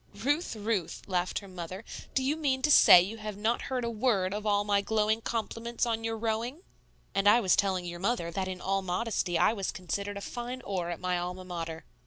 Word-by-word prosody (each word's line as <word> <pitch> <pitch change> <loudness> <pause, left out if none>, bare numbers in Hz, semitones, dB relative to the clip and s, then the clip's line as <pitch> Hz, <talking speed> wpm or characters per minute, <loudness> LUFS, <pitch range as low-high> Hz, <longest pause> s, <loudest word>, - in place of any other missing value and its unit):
"Ruth, 290 +3 0
Ruth," 210 -5 -2
laughed 180 -2 -1
her 200 - -5
mother, 185 +2 -7 0.3
"do 265 - +2
you 280 +3 +1
mean 270 -4 0
to 300 - +3
say 175 -10 +9
you 210 +5 -5
have 215 -2 -6
not 225 +3 0
heard 255 -2 -1
a - - -1
word 210 -5 +1
of 210 +1 -3
all 205 0 +3
my 205 -1 +2
glowing 215 +1 +1
compliments 230 +1 -2
on 225 -1 -1
your 225 0 -2
rowing?" 230 - -2 0.5
"And 195 +1 +4
I 225 +3 +6
was 190 -6 +3
telling 190 -2 +1
your 175 0 -6
mother 190 -4 -1
that 190 +2 -2
in 185 -1 -5
all 195 +1 0
modesty 185 -1 -1
I 215 - +4
was 195 -4 -2
considered 200 +3 -4
a - - -6
fine 245 +4 -5
oar 180 -3 -2
at 175 - -4
my 180 -1 0
Alma 180 +1 -5
Mater." 165 -2 -5
205 Hz, 220 wpm, -29 LUFS, 185-230 Hz, 0.5 s, say